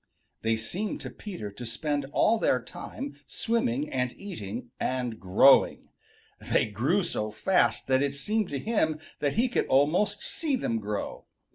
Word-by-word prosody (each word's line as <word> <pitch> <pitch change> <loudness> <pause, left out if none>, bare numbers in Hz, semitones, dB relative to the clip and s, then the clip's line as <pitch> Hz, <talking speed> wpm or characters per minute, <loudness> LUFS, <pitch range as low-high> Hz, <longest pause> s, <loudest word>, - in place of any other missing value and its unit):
They 110 0 +1
seemed 185 - -3
to - - -6
Peter 175 - -7
to 110 +5 -9
spend 145 +4 -2
all 225 +8 +3
their 125 - +3
time 265 - -7
swimming 240 +5 0
and 125 -1 0
eating 120 - -6
and 125 -3 -2
growing. 100 +9 +5 0.5
They - - +2
grew 130 - +1
so 110 -10 -2
fast 180 - +2
that 130 0 +3
it 140 0 0
seemed 210 +7 -1
to 140 - -2
him 160 - 0 0.2
that 145 -2 0
he 235 +4 +3
could 245 - 0
almost 170 +10 +2
see 305 -4 0
them 115 - -1
grow. 105 -1 -4
140 Hz, 155 wpm, -28 LUFS, -, 0.5 s, growing